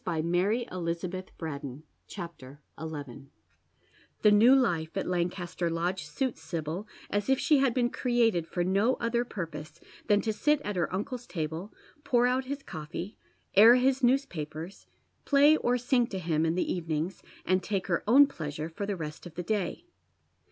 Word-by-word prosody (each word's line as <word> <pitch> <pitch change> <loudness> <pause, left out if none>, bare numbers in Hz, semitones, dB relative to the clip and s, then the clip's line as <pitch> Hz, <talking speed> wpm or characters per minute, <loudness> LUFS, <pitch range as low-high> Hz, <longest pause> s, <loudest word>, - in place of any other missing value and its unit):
CHAPTER 175 +8 0
XL 185 - -7
BOW 170 0 +1
STEPHEN 160 -6 -6 0.2
TRENCHABD 170 -8 -8 0.3
FORGIVEN 145 -4 -7 0.9
The 210 - +7
new 230 +6 +7
life 170 -11 +1
at - - -1
Lancaster 175 -1 -2
Lodge 165 0 -2
suits 230 - -3
Sibyl 160 +4 -4 0.2
as 205 +4 -1
if 265 - +4
she 300 -3 +4
had 265 -3 +2
been 245 -1 +1
created 230 -9 +1
for 175 - -1
no 200 +7 +2
other 235 +1 0
purpose 165 -7 -7 0.3
than 205 -2 +4
to 220 - -1
sit 295 +7 +2
at 210 -7 -4
her 175 -3 0
uncle's 240 +6 -4
table, 165 +3 -4 0.3
pour 245 -2 +3
out 255 +1 +1
his 280 +1 -5
coffee, 165 +4 -6 0.4
air 225 +5 +9
his 260 +1 +2
newspapers, 185 - -1 0.4
play 285 +2 +5
or 245 -3 +1
sing 245 -1 +2
to 195 - -5
him 165 -3 0
in 160 - 0
the 185 - 0
evenings, 165 +1 -3 0.2
and 185 +1 +2
take 195 0 -2
her 170 -3 0
own 270 +6 +8
pleasure 155 - -5
for 200 +5 -5
the 200 -2 -2
rest 155 +1 -7
of 165 - -14
the 175 - -4
day. 210 - -2
185 Hz, 165 wpm, -29 LUFS, 165-240 Hz, 0.9 s, air